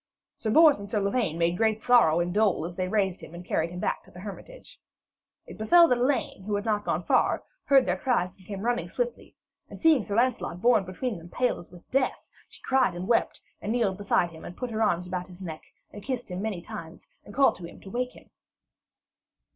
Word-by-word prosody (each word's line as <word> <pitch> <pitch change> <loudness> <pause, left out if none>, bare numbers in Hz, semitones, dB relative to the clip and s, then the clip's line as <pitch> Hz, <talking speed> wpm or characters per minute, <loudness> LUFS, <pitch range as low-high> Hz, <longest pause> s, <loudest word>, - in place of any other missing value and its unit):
Sir 220 - -4
Bors 305 +1 +6
and 200 0 -8
Sir 210 - 0
Lavaine 200 -4 0
made 170 +1 +1
great 220 0 +1
sorrow 230 -10 +5
and 175 0 -2
dole 205 -5 +2
as 175 0 -6
they 185 0 -2
raised 190 -2 0
him 165 - -11
and 175 +1 -9
carried 160 -1 0
him 180 +1 -7
back - - -1
to - - -19
the 180 - -12
hermitage. 215 - -10 0.7
It - - -12
befell 340 +10 +6
that 250 - +2
Elaine, 255 -5 0
who 205 +2 -2
had 205 +2 -3
not 210 -2 0
gone - - -1
far, - - +2 0.2
heard 270 -2 +5
their - - -1
cries 235 -10 0
and 190 - -20
came 200 -2 -5
running 245 +2 -1
swiftly, - - -4 0.3
and - - -10
seeing 315 -8 +4
Sir 200 - -4
Lancelot 235 -6 0
borne 225 -2 +4
between 190 +3 -4
them 165 +1 -13
pale 250 +7 0
as 175 - -13
with 175 -1 -16
death, 265 0 0 0.2
she - - -18
cried 260 -9 +2
and 180 +2 -5
wept 235 - +1 0.2
and 210 - -3
kneeled 220 -6 0
beside 185 -4 +1
him, 160 - -12
and 175 - -9
put 250 -2 -4
her 220 0 -2
arms 180 -5 +1
about 180 0 -4
his 180 -1 -14
neck 165 -4 -7 0.3
and 205 - -9
kissed 245 -3 -4
him 180 +1 -4
many 200 -5 -3
times, 165 -1 -9 0.2
and 205 - -13
called 275 0 +4
to 175 - -8
him - - -13
to 195 - -11
wake 250 +1 -2
him. - - -18
205 Hz, 230 wpm, -27 LUFS, 180-245 Hz, 0.7 s, Bors